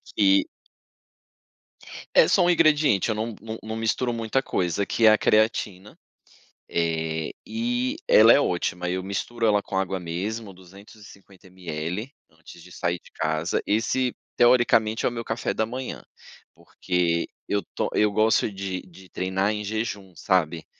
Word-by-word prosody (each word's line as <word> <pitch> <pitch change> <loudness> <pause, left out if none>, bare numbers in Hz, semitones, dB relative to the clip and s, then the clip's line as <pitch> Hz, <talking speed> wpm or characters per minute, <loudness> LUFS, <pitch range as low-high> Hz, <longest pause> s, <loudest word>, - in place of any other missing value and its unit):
que 100 -1 +4 1.7
É - - +7
só - - +4
um 175 - +4
ingrediente, 150 - +3
eu 110 - 0
não 110 +1 -3
não 110 +1 -7
não 110 +1 -5
misturo 115 +2 -1
muita 115 +3 -1
coisa, 90 -1 -1
que 115 - 0
é - - +9
a 110 - +3
creatina, 105 -3 0 0.7
eh, 80 -1 -1
e 245 +4 -2
ela - - +7
é - - +5
ótima. 90 -3 -1
Eu 95 +1 -2
misturo 115 +4 -3
ela 105 -1 +3
com 95 - -5
água 95 0 -1
mesmo, 100 +5 -5
250 100 +1 -16
ml, 90 - -5 0.2
antes 80 +1 -15
de 90 +1 -15
sair 85 0 -2
de - - -19
casa. 80 +2 -1
Esse, 120 +4 0 0.2
teoricamente, 120 -2 +3
é - - +3
o - - -10
meu 115 -1 -5
café 110 +1 -2
da 110 - 0
manhã, 125 +3 -6 0.5
porque 85 -2 -1 0.2
eu 100 -3 -1
to - - -1
eu 105 -1 +2
gosto 110 +1 +2
de 95 -1 -5
de 95 0 -17
treinar 95 +4 -1
em 105 0 -4
jejum, 100 -3 -4
sabe, 85 -2 0
100 Hz, 155 wpm, -24 LUFS, 90-115 Hz, 1.7 s, é